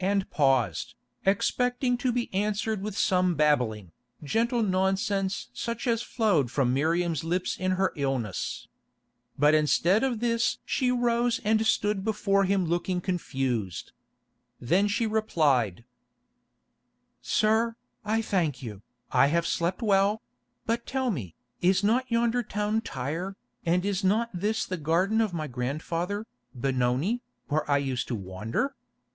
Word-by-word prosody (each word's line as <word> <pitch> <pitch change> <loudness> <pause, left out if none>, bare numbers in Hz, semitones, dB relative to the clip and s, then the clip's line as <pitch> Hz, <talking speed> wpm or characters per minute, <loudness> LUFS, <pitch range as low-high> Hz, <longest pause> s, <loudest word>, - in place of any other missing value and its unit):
and 195 0 +1
paused, 130 - +1 0.3
expecting 245 +5 +1
to 245 +1 0
be 240 0 -1
answered 210 +1 -1
with 205 0 -5
some 180 -1 +2
babbling, 125 - +1 0.3
gentle 230 - +1
nonsense 190 - 0
such 235 - -4
as 230 -2 +1
flowed 200 - +1
from 125 -1 +1
Miriam's 165 +2 +1
lips 180 +2 -1
in 185 0 0
her 190 +1 +1
illness. 135 -8 -2 0.7
But 150 +2 +5
instead 170 - +3
of 250 -4 0
this 230 0 +1
she 255 - +1
rose 240 -1 +1
and 220 +1 +2
stood 205 -2 +1
before 200 -2 +1
him 190 -1 +1
looking 175 +2 -1
confused. 130 - -2 0.7
Then 180 +11 +2
she 205 +3 0
replied: 145 - +1 1.4
"Sir, 220 +2 +2 0.3
I 220 +2 0
thank 165 - 0
you, 105 -4 -7 0.3
I 140 - +5
have 170 +3 +1
slept 175 +7 -1
well; 205 +1 +2 0.4
but 230 +1 -1
tell 260 -2 0
me, 105 - -5 0.3
is 185 +2 +3
not 245 +5 +2
yonder 235 +1 +2
town 210 0 -1
Tyre, 175 - -4 0.3
and 180 +3 +2
is 200 -1 -1
not 220 +5 +2
this 210 +5 -1
the 185 - -4
garden 175 +8 +2
of 220 -3 0
my 160 -3 -3
grandfather, 160 - -3 0.3
Benoni, 130 - 0 0.3
where 150 0 0
I 145 - +4
used 135 -3 -2
to 120 - -2
wander? 105 - -3
190 Hz, 135 wpm, -27 LUFS, 145-220 Hz, 1.4 s, But